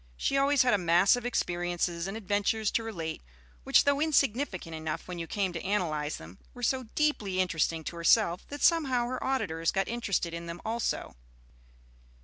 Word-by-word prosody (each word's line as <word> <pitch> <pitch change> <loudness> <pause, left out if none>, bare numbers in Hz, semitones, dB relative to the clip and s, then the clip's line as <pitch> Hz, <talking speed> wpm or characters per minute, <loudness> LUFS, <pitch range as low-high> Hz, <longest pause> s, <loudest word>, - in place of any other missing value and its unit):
She 275 - 0
always 275 -1 +4
had 250 - +3
a 205 - +3
mass 175 +4 +4
of 245 0 -3
experiences 175 -4 -1
and 195 +3 -4
adventures 205 +1 0
to - - +1
relate, 170 -8 -5 0.4
which - - +5
though 285 0 +2
insignificant 270 - +1
enough 160 -1 -4
when 180 -1 -6
you 165 - -4
came 190 0 -1
to 165 - -4
analyze 155 -7 -1
them, 80 +4 -12 0.2
were 245 - -9
so 260 +1 +1
deeply 215 -12 0
interesting 165 -3 0
to 170 - -6
herself 170 +1 +3
that 290 0 -6
somehow 270 -8 +3
her 255 +1 -4
auditors 165 -12 0
got 195 -1 0
interested 205 -8 -1
in 170 0 -6
them 170 +1 -6
also. 225 +1 -2
195 Hz, 175 wpm, -29 LUFS, 170-245 Hz, 0.4 s, which